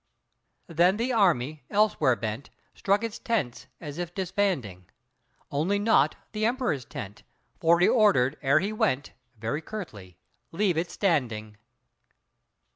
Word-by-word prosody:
Then 175 +2 +2
the 245 +3 -1
army, 155 - +2
elsewhere 200 - +3
bent, 110 +3 -5 0.2
Struck 200 +2 +1
its 230 -2 -4
tents 150 - -2
as 150 0 -7
if 175 0 -5
disbanding, 175 - -2 0.6
Only 165 +8 +1
not 200 -9 +3 0.2
the 215 0 -3
Emperor's 235 - 0
tent, 105 +1 -8 0.4
For 170 +1 +4
he 180 - +5
ordered, 155 - +4
ere 140 +1 +4
he 200 +3 -2
went, 140 -9 0 0.2
Very 115 +8 -3
curtly, 105 - -8 0.3
"Leave 185 0 +1
it 165 +2 -1
standing!" 115 - -1
165 Hz, 125 wpm, -27 LUFS, 130-205 Hz, 0.6 s, he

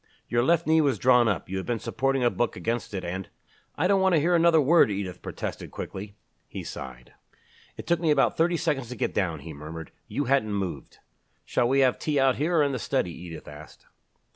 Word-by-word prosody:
Your 120 0 +1
left 170 +5 +2
knee 160 0 +4
was 140 -6 +1
drawn 125 +2 +4
up 100 -7 -1
you 95 - -4
had 95 - -5
been 120 -1 0
supporting 135 +3 -1
a 120 - +3
book 120 -2 -1
against 115 -2 -3
it 95 - -4
and 95 +1 -5 0.2
" - - -35
"I 160 - +1
don't 195 0 +3
want 190 -2 +4
to - - +4
hear 170 +4 +2
another 170 -1 +5
word," 155 -1 +5
Edith 95 -3 -4
protested - - -6
quickly. 100 +1 -7 0.3
He - - -7
sighed. 60 -2 -9 0.6
"It - - -7
took 170 -1 +1
me 165 -2 0
about 145 -2 +3
thirty 170 +1 +2
seconds 145 -7 -1
to 125 - -6
get - - -2
down," 85 -7 -1
he 80 +2 -8
murmured. 80 +3 -8 0.2
"You 145 - -2
hadn't 125 -5 +1
moved." 95 -3 -5 0.5
"Shall 120 - +1
we 135 +1 +3
have 130 -2 +3
tea 150 -2 0
out 135 -1 +3
here 165 +4 +1
or 150 - +5
in 140 - +1
the 130 - -3
study?" 120 -8 -1
Edith 85 -2 -9
asked. 75 +1 -12
125 Hz, 225 wpm, -26 LUFS, 95-150 Hz, 0.6 s, another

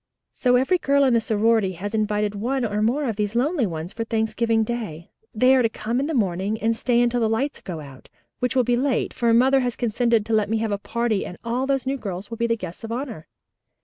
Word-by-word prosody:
So 250 -1 +2
every 265 +9 +3
girl 280 -2 +3
in 260 -3 +3
the 230 - +3
sorority 220 -2 +2
has 200 +5 -6
invited 210 -1 0
one 245 +5 -1
or 210 -1 -1
more 260 +6 +1
of 220 -4 -2
these 210 +1 -2
lonely 270 - +1
ones 165 +1 -6
for 230 - -3
Thanksgiving 225 0 0
Day. 215 -9 -5 0.2
They 255 +4 +4
are 260 - +4
to 230 - +2
come 225 +3 -2
in 280 - -1
the 320 - -2
morning 200 0 0
and 225 +1 +1
stay 240 +1 +1
until 240 0 +2
the 225 -2 +1
lights 265 +6 -1
go 170 -5 -6
out, 135 -3 -13 0.3
which 250 +1 -1
will 255 - +4
be 245 +1 +2
late, 260 0 0
for 235 -1 +1
mother 260 +4 +5
has 245 -2 -1
consented 235 -1 +1
to 225 - -2
let 215 -2 +2
me 225 - +1
have 220 -1 -1
a 200 - -1
party 235 -1 -1
and 180 - -8
all 245 +3 -1
those 270 -1 0
new 270 +1 -1
girls 195 -5 -5
are - - -21
to 230 - -5
be 235 0 0
the 230 0 +1
guests 185 0 -8
of 225 - -6
honor. 235 - -5
230 Hz, 250 wpm, -23 LUFS, 210-250 Hz, 0.3 s, mother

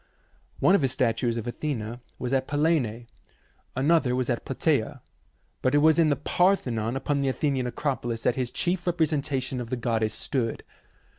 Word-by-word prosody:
One - - +5
of 200 - +4
his 135 -2 +2
statues 120 -2 0
of 115 - -4
Athena 120 -3 -4 0.2
was 125 +1 -3
at 130 -1 +1
Pellene, 145 -7 0 0.7
another 135 -1 +3
was 125 0 0
at 120 - -2
Platasa; 135 -3 0 0.6
but 130 +2 +2
it - - +6
was 155 +2 +5
in 160 -2 +5
the 145 - +3
Parthenon 130 - +1
upon 140 +1 -1
the 135 - +1
Athenian 130 -2 0
Acropolis 120 -3 -2
that - - +3
his 125 -1 -2
chief 175 +5 -1
representation 145 -6 0
of 115 - -7
the 130 - -2
goddess 110 -3 0
stood. 115 -1 -2
130 Hz, 165 wpm, -26 LUFS, 120-150 Hz, 0.7 s, it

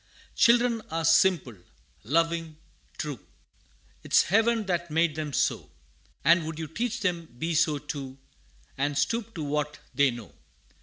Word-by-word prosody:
Children 235 -1 +4
are 165 0 -2
simple 165 - +3 0.5
loving 165 +4 0 0.4
true; 145 -6 -4 0.8
'Tis - - +4
Heaven 225 +3 +2
that 175 -2 -2
made 165 0 +2
them 155 -1 -4
so; - - 0 0.6
And 170 +1 +5
would 160 -1 -5
you 160 - -4
teach 230 - -3
them 175 -4 -1
be 165 +5 -2
so 155 -2 +2
too 140 -2 -7 0.6
And 145 0 0
stoop 225 - -1
to 160 - -4
what 150 0 -2 0.2
they 140 +1 +4
know. 120 -3 -8
165 Hz, 140 wpm, -27 LUFS, 145-185 Hz, 0.8 s, And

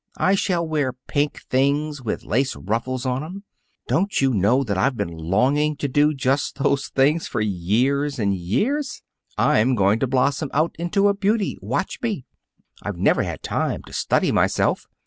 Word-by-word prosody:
I 190 - +3
shall 180 -4 0
wear 145 -5 0
pink 145 +1 -1
things 145 +2 +1
with 115 - -3
lace 130 +4 0
ruffles 120 +5 -3
on 130 +2 -1
'em. 185 +5 -8 0.4
Don't 195 +4 +1
you 135 -1 +2
know 110 +7 +3
that 105 -6 -2
I've 120 +7 +1
been 90 -5 -3
longing 130 - +1
to 145 - -2
do 145 +3 +3
just 135 0 0
those 140 0 +1
things 145 +5 +2
for - - -3
years 120 +9 0
and 100 -4 +1
years? 245 - -1 0.3
I'm 125 +4 +3
going 100 +1 +3
to 135 - 0
blossom 135 +3 +1
out 155 +3 +1
into 195 +4 +2
a 200 - +3
beauty. 205 +1 0
Watch - - -2
me! 210 - -2 0.6
I've - - -5
never - - +3
had - - -5
time - - -2
to - - -14
study - - +1
myself. - - +1
135 Hz, 170 wpm, -22 LUFS, 120-155 Hz, 0.6 s, I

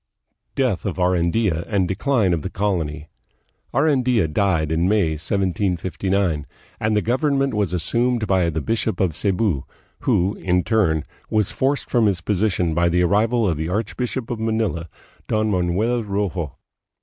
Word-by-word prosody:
Death 125 -8 0
of 95 - -3
Arandia 90 0 +1
and 100 -4 +1
Decline 105 0 +1
of 80 - -1
the 95 - -4
Colony. 80 -7 -2 0.6
Arandfa 125 - +2
died 80 -5 +1
in 85 +3 +2
May, 100 -6 +2
1759, 95 -1 -1 0.3
and 110 0 +1
the 105 - +1
government 135 +2 +1
was 105 -5 0
assumed 115 +6 0
by 95 -4 +2
the 80 -1 -2
bishop 110 +5 -1
of 90 -6 +1
Cebu, 95 -5 0 0.4
who 95 +3 +1
in 90 -1 +1
turn 90 -10 +2 0.3
was 105 -3 +1
forced 140 +2 0
from 120 -3 +4
his 95 -4 +1
position 90 -3 0
by 85 +1 +2
the 90 +1 +2
arrival 110 +5 +2
of 85 -5 0
the 80 +2 -3
archbishop 115 +5 -3
of 120 - -3
Manila, 110 -7 -1 0.4
Don 110 0 +1
Manuel 100 +6 +1
Rojo. 100 -6 -3
100 Hz, 150 wpm, -22 LUFS, 85-110 Hz, 0.6 s, from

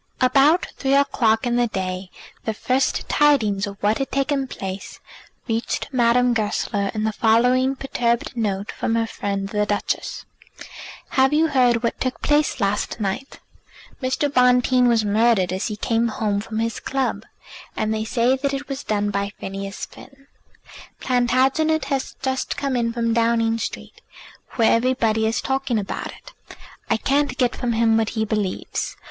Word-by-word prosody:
About 275 +6 +4
three 270 0 +1
o'clock 235 -5 +2
in 240 0 +1
the 240 0 +2
day 185 -2 -4 0.4
the 220 - -2
first 255 +4 0
tidings 220 -10 +2
of 200 0 -8
what 210 +2 +2
had 270 - -2
taken 275 0 0
place 195 -5 -7 0.5
reached 225 0 -2
Madame 245 -1 +3
Goesler 205 -2 -1
in 215 - -1
the 220 - +1
following 250 +5 +3
perturbed 245 -2 -1
note 205 -3 -2
from 225 - -2
her 230 0 +1
friend 200 -3 -3
the 210 0 0
Duchess: 205 -1 -2 0.8
"Have 265 +1 +3
you 320 +2 +3
heard 245 -4 +3
what 235 - -1
took 255 -1 -2
place 295 -2 +2
last 205 +2 -1
night? 210 +7 -4 0.6
Good 255 - -2
God! 290 - +2
Mr. - - -26
Bonteen 250 0 +4
was 230 -3 +3
murdered 210 -3 +2
as 190 +4 -2
he 215 - -4
came 230 +2 0
home 210 -2 -1
from 220 +1 -6
his 230 0 -1
club, 270 -1 -2 0.5
and 215 0 0
they 220 0 -1
say 240 +3 +2
that 275 +1 -1
it 275 +1 -6
was 275 0 -5
done 205 -1 -1
by 200 0 -2
Phineas 195 0 -5
Finn. 275 0 -16 0.7
Plantagenet 260 +5 +2
has 270 - -3
just 265 0 -2
come 275 -2 -1
in 235 -1 0
from 230 -1 0
Downing 230 0 +2
Street, - - -6 0.5
where 230 -2 +4
everybody 230 -3 +1
is 225 - -1
talking 265 -3 -1
about 200 -2 -3
it. - - -13 0.6
I 225 - +3
can't 275 +2 0
get 250 -1 +1
from 240 -2 -1
him 225 0 +3
what 225 -1 +1
he 220 - +1
believes. 210 -3 -3
235 Hz, 165 wpm, -22 LUFS, 215-260 Hz, 0.8 s, About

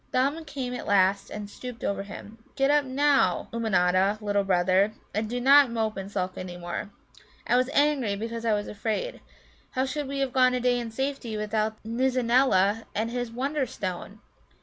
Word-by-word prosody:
Thumb 280 +6 +1
came 260 -4 -4
at 250 - -6
last 195 0 +3
and 210 -1 -6
stooped 245 +3 -9
over 200 0 -1
him. 205 +2 -10 0.2
"Get 270 0 +3
up 295 -1 +3
now, 270 -8 +2
Ummanodda, 195 -3 +2
little 205 -1 0
brother, 190 +2 +2 0.2
and 215 +1 -1
do 245 +1 -2
not 275 +1 +6
mope 220 -2 -1
and 195 +1 -6
sulk 185 -2 -3
any 180 -1 -6
more. 175 +3 -5 0.6
I - - +2
was 255 +1 +2
angry 280 -8 +2
because 230 +2 -5
I 225 -2 +2
was 205 0 -3
afraid. 220 - -3 0.5
How 260 +1 -1
should 290 +1 -3
we 275 +1 -4
have 270 -2 -1
gone 255 -1 +4
a - - 0
day 245 0 +2
in 235 -1 -4
safety 265 -2 -3
without 215 +1 -1
the 220 - -8
Nizza 255 +2 +1
neela 225 -4 +3
and 225 +2 -1
his 245 -1 -3
Wonderstone? 230 - -3
230 Hz, 185 wpm, -27 LUFS, 200-260 Hz, 0.6 s, not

